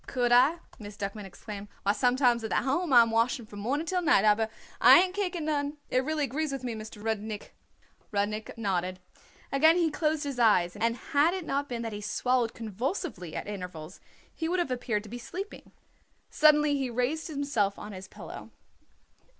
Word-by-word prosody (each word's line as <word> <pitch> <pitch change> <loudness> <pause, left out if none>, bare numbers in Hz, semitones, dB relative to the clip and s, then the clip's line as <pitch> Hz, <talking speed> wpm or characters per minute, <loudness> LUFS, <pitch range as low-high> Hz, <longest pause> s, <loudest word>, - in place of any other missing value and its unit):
"Could 245 -2 0
I?" 255 +7 +6 0.2
Miss 205 -1 -9
Duckman 205 0 -5
exclaimed. 200 +2 -9 0.2
"Why, 200 - +3
sometimes 245 0 +2
at 220 - -3
the - - -1
Home 285 +6 0
I 240 -2 +9
am 230 - -2
washing 230 +1 +1
from 205 -1 -10
morning 275 +9 -1
till 365 +1 0
night, 290 - +4
aber 215 +1 +3 0.3
I - - +9
ain't 370 0 +1
kicking 365 -5 -2
none. 290 -1 -1
It 255 - +2
really 310 +1 -1
agrees 290 +3 -2
with 270 -2 -5
me, 245 -2 -3
Mr. 215 -1 -9
Rudnik." 215 -1 -4 0.6
Rudnik 210 +2 -2
nodded. 185 -4 -1 0.5
Again 315 +5 +5
he 335 -3 +2
closed 310 0 0
his 280 -3 -4
eyes, 185 -7 +4
and 230 +3 0 0.2
had 305 +5 +4
it 370 -3 -5
not 280 0 -2
been 235 -1 -3
that 225 -2 -4
he 205 - -6
swallowed 245 +2 0
convulsively 225 - -4
at - - -4
intervals 180 -4 -7 0.3
he 325 -1 -3
would 365 - +1
have 345 -7 -1
appeared 240 -4 -1
to 215 - -11
be 245 - -6
sleeping. 380 - -8 0.6
Suddenly 300 -1 +5
he 270 -2 -1
raised 250 +7 -1
himself 280 -10 -1
on 210 - -8
his 190 -1 -9
pillow. - - -10
245 Hz, 190 wpm, -28 LUFS, 210-295 Hz, 0.6 s, I